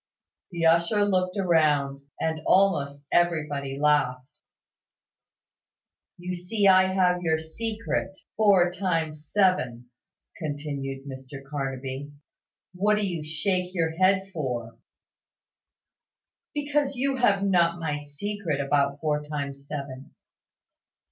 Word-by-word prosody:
The 170 -2 -2
usher 170 +6 +4
looked 185 -1 0
round, 150 -6 +2 0.2
and 160 -1 -1
almost 145 -7 +2
everybody 150 -5 0
laughed. 145 -2 +1 1.8
"You 180 +1 -5
see 180 +4 -1
I 185 0 +6
have 180 -1 +2
your 160 -2 +1
secret; 195 +3 -4 0.2
four 195 -5 +4
times 160 -5 -2
seven," 125 - +1 0.5
continued 145 -3 -4
Mr 135 0 -9
Carnaby. 135 0 -4 0.6
"What 205 +4 +2
do 210 -1 0
you 175 -5 -3
shake 180 +4 -1
your 165 -2 +1
head 190 +3 +2
for?" 120 -7 -4 1.8
"Because 290 -1 0
you 270 +1 0
have 200 -6 +3
not 175 -3 +3
my 150 -3 -2
secret 160 +1 -4
about 140 0 +1
four 150 -1 0
times 140 -2 -5
seven." 140 -2 -7
160 Hz, 105 wpm, -26 LUFS, 140-190 Hz, 1.8 s, I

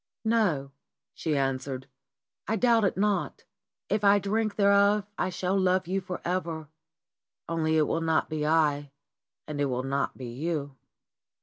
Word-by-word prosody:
"No," 190 -12 +1 0.4
she 155 -3 -1
answered, 135 -1 -2 0.6
"I 220 - +1
doubt 230 0 +3
it 190 - 0
not. 205 0 0 0.4
If 210 0 0
I 200 0 +6
drink 215 +2 -1
thereof 200 0 +4
I 185 - -1
shall 185 +1 -1
love 185 -1 +2
you 195 +2 -1
for 180 -1 -5
ever, 165 -4 -2 0.8
only 160 -1 +1
it 155 - +4
will 165 - -1
not 160 -1 +1
be 155 -1 -3
I, 150 -2 +2 0.6
and 150 -1 -3
it - - +3
will 130 -2 -1
not 140 +1 -1
be 130 - -7
you." 140 +3 -3
165 Hz, 150 wpm, -28 LUFS, 145-200 Hz, 0.8 s, I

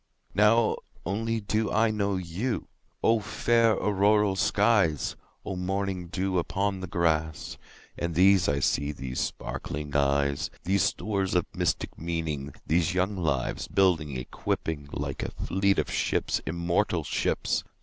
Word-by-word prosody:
Now 105 +3 +4 0.3
only 115 +5 -1
do 110 +1 0
I 115 0 +3
know 100 -2 0
you!O 105 +4 -2
fair 115 +2 +2
auroral 105 0 +3
skies! 100 -6 +2 0.3
O 95 - -3
morning 95 0 -2
dew 95 +1 0
upon 95 +3 -1
the 95 - -5
grass! 80 -3 -1 0.4
And 85 -1 -2
these 95 -1 +5
I 70 0 0
see—these 70 -3 -1
sparkling 75 0 -4
eyes, 70 0 +2
These 95 +2 +2
stores 100 -3 0
of 90 - +3
mystic - - -1
meaning—these 80 +1 -1
young 95 +2 +1
lives, 75 -8 -1
Building, 80 -8 +2
equipping, 70 +3 -3
like - - -4
a - - -2
fleet 100 +1 0
of - - 0
ships—immortal 85 +1 0
ships! - - 0
90 Hz, 120 wpm, -27 LUFS, 80-100 Hz, 0.4 s, these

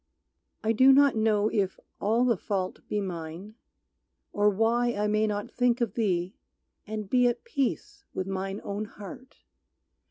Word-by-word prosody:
I 220 - +2
do 260 +4 +6
not 280 -1 +5
know 215 -1 +2
if 195 -4 0 0.2
all 225 +4 +2
the 240 -2 +3
fault 185 -1 -3
be 210 - 0
mine, 175 +1 -6 0.8
Or 205 0 +4
why 230 +4 +2
I 205 +1 0
may 215 +1 +2
not 205 -1 -3
think 245 0 +2
of 235 -5 -1
thee 185 -5 0 0.5
and 215 -1 -4
be 250 +3 +4
At 240 - -1
peace 275 - -2
with 185 - -3
mine 195 +1 -4
own 205 +1 -3
heart. 250 +6 -12
210 Hz, 155 wpm, -28 LUFS, 195-240 Hz, 0.8 s, do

